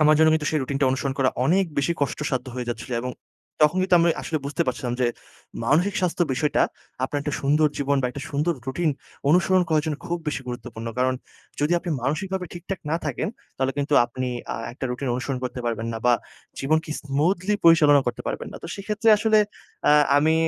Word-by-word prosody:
আমার 155 0 +6
জন্য 160 0 +6
কিন্তু 155 -1 -1
সেই 155 - +1
রুটিনটা 135 0 +1
অনুসরণ 135 +1 -1
করা 130 -1 +3
অনেক 185 +7 +3
বেশি 140 +5 +2
কষ্টসাধ্য 140 -2 -1
হয়ে 125 -1 -4
যাচ্ছিল। 120 +1 -5
এবং 125 - -3 0.5
তখন 150 +4 +5
কিন্তু 185 -1 +3
আমি 170 - +4
আসলে 155 - -1
বুঝতে 140 +1 0
পারছিলাম 125 -1 -2
যে 125 - +4 0.6
মানসিক 170 - +2
স্বাস্থ্য 180 -1 +1
বিষয়টা 150 +3 +2 0.4
আপনার 145 +2 -2
একটা 150 0 -2
সুন্দর 150 +3 +3
জীবন 140 0 +1
বা - - +2
একটা 140 +3 -7
সুন্দর 150 +4 +1
রুটিন 155 +5 0 0.4
অনুসরণ 180 +3 +4
করার 155 -2 +2
জন্য 155 -2 -1
খুব 175 0 -1
বেশি 145 - -2
গুরুত্বপূর্ণ। 115 -2 -6
কারণ 130 0 +2 0.5
যদি 150 +3 +2
আপনি 175 0 -5
মানসিকভাবে 185 +7 -1
ঠিকঠাক 180 +2 -6
না 160 - +2
থাকেন 145 +3 -2 0.3
তাহলে 135 0 0
কিন্তু 145 +1 +1
আপনি 125 +1 -4 0.3
আ - - -4 0.2
একটা 130 - -6
রুটিন 125 +2 -3
অনুসরণ 130 +1 -2
করতে 125 0 -4
পারবেন 115 -1 -2
না। 115 - -3
বা 120 - +6 0.5
জীবনকে 155 +3 +1
স্মুথলি 170 +8 +1
পরিচালনা 155 -4 +7
করতে 120 - -2
পারবেন - - -3
না। - - -7
তো - - -6
সেক্ষেত্রে 210 +3 -1
আসলে 215 0 +4 0.5
আ - - +7 0.2
আমি 155 +2 +4
145 Hz, 195 wpm, -24 LUFS, 130-170 Hz, 0.6 s, পরিচালনা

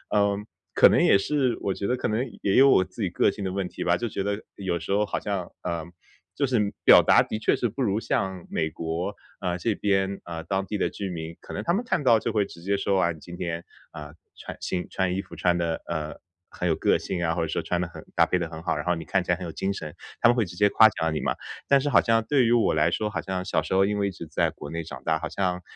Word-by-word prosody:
嗯， 100 0 +1 0.3
可 - - +7
能 - - +3
也 - - +6
是 130 +4 +1
我 100 - -1
觉 100 - -4
得 125 - +1
可 - - -2
能 110 +4 0 0.2
也 100 - +1
有 135 - +7
我 115 -8 +5
自 95 +4 -7
己 95 - 0
个 - - +3
性 100 - -5
的 95 - -2
问 95 -1 -2
题 - - -5
吧。 85 0 +3
就 115 +6 -3
觉 100 - -3
得 100 +1 -2
有 95 -3 -2
时 - - -6
候 105 +2 +3
好 - - -2
像， 100 -4 -3
呃， 85 -2 -3 0.5
就 140 - +1
是 110 -6 +1
表 - - +8
达 - - +6
的 110 - -3
确 110 - +2
是 120 - -1
不 135 +6 -3
如 105 -1 +1
像 95 -5 -2
美 80 -1 -1
国， 85 +6 -3 0.2
啊 90 -1 -1
这 105 +4 -1
边， 100 -1 0
啊， 85 -1 -6
当 95 +4 -2
地 105 +1 -4
的 - - +1
居 100 -2 -5
民， 85 -1 -6
可 - - -10
能 - - -4
他 170 - +1
们 225 - -1
看 180 - 0
到 120 -4 +6
就 110 +1 -2
会 105 -2 +3
直 85 - -13
接 100 +2 +1
说：” 100 0 0
啊， 85 - +1
你 80 - -9
今 85 +3 -10
天， 85 -1 -3 0.3
呃， 75 0 -9 0.2
穿 - - -9
新 90 -1 -3
穿 95 -1 0
衣 95 - -1
服 95 - -12
穿 90 -1 +2
得， 85 -1 -1
呃， 80 -2 -3 0.4
很 90 - -2
有 80 - +2
个 - - +2
性 85 - -3
啊， 80 - +1
或 85 - -2
者 80 - 0
说 80 - -2
穿 90 0 -1
得 90 - -2
很 - - -11
搭 - - +5
配 90 - +1
得 85 - -2
很 80 0 -9
好。 - - 0
然 - - -4
后 90 - +2
你 80 - -6
看 95 -2 +1
起 90 - -1
来 - - +3
很 90 - -7
有 85 - -5
精 95 +4 -2
神。 75 -6 -6 0.3
“他 - - +6
们 120 - +4
会 115 -3 +2
直 90 -1 -10
接 105 +3 +4
夸 110 +2 +7
奖 80 -5 -2
你 75 - -1
嘛。 - - 0 0.3
但 140 - +5
是 145 - -1
好 - - +6
像 115 -1 +2
对 135 -2 +3
于 115 - +2
我 120 -2 +3
来 80 +2 +3
说， 105 +4 -1
好 100 -5 -3
像 95 +1 -3
小 95 - +1
时 - - -3
候 95 +1 +5
因 105 - -1
为 100 -1 +1
一 - - -3
直 85 -2 -9
在 75 - +1
国 75 - -9
内 85 0 -3
长 75 -5 -9
大， 80 -1 +1
好 80 - -3
像 90 +1 -1
95 Hz, 315 characters per minute, -26 LUFS, 85-105 Hz, 0.5 s, 表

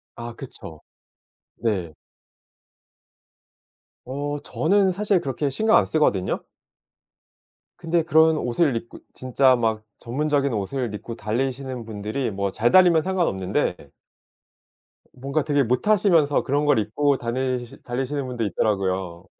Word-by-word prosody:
아 120 0 -7
그쵸. 85 - -10 0.8
네. 95 -8 -2 2.1
어 145 +3 -3
저는 195 +3 +2
사실 200 -1 +1
그렇게 140 +1 -2
신경 220 +8 +3
안 - - +3
쓰거든요. 105 -12 0 1.4
근데 170 -1 0
그런 160 -1 +4
옷을 130 +1 +1
입고 115 +1 -6
진짜 130 0 +3
막 110 -2 -1 0.2
전문적인 140 +1 0
옷을 110 +3 -3
입고 115 +2 -7
달리시는 125 +2 -3
분들이 110 +3 -3
뭐 100 0 -2
잘 115 +4 +1
달리면 175 -4 +6
상관없는데 145 - 0 1.4
뭔가 140 +3 -2
되게 145 -2 +2
못하시면서 165 - +3
그런 145 +2 0
걸 145 -6 +4
입고 135 +7 +1
다니시 125 0 -3
달리시는 135 +3 -3
분도 120 -3 -3
있더라고요. 95 -3 -1
130 Hz, 255 characters per minute, -23 LUFS, 110-150 Hz, 2.1 s, 달리면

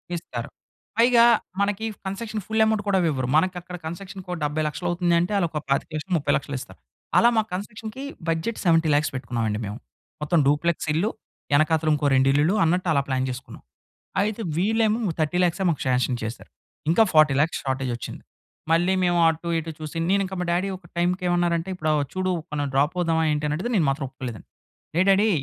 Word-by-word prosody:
ఇస్తారు. 120 -8 -6 0.5
పైగా 235 0 +6 0.3
మనకీ 205 +2 0 0.2
కన్సెషను 215 +3 -4
ఫుల్ 220 0 +1
యమౌంట్ 220 -1 +1
కూడా 195 -1 +3
ఇవ్వరు. 135 -6 0
మనకక్కడ 180 +2 0
కన్సక్షన్‌కో 185 +2 -7
70 150 +1 0
లక్షలవుతుంది 175 +2 -1
అంటే, 175 +4 -1
ఆళ్ళోక 165 -5 0
25,00,000 155 +5 -1
ముప్పై 145 - 0
లక్షలిస్తారు. 135 -1 -7 0.4
అలా 235 - +6
మా 220 - +4
కన్సక్షన్‌కీ 220 +6 -6 0.3
బడ్జెట్ 165 +8 -1
70,00,000 160 -3 +3
పెట్టుకున్నామండి 115 -4 -2
మేము. 105 +2 -5 0.5
మొత్తం 165 +2 +2
డూప్‌లెక్సిల్లు, 160 +5 +1 0.4
యెనకాతలుంకో 155 0 +2
రెండిళ్ళులు 140 +6 +3
అన్నట్టలా 165 -3 +2
ప్లాన్ 130 -1 0
జేసుకున్నాం. 125 +1 -8 0.6
అయితే 215 +2 -1 0.2
వీళ్ళేమో 220 +4 +2
ము 175 - 0
30 155 +2 0
ల్యాక్సే 180 +2 +1
మాకు 160 - 0
ష్యాన్షన్ 125 0 +1
చేసారు. 110 +2 -6 0.4
ఇంకా 175 - +5
40,00,000 155 0 +4
షార్టేజొచ్చింది. 130 -3 -3 0.5
మళ్ళీ 175 +3 +3
మేము 175 -1 +2
అటు 165 +1 -2
ఇటు 165 0 -4
చూసి, 155 0 -7
నేనింక 195 0 +1
మా - - -1
డ్యాడీ 180 +3 +1
ఒక 180 - -20
టైంకేమన్నారంటే, 175 0 +1
"ఇప్పుడా 155 -3 -1
వ - - +1
చూడు, 185 0 -1 0.2
మనం 145 -1 -1
డ్రాపవుదామా" 160 +3 +1
ఏంటనడిగితే, 150 +9 -1
నేను 165 - +3
మాత్రం 135 0 -2
ఒప్పుకోలేదండి. 125 -6 -8 0.5
ఏ - - +5
డ్యాడీ 200 +3 +5
165 Hz, 150 wpm, -24 LUFS, 150-190 Hz, 0.6 s, పైగా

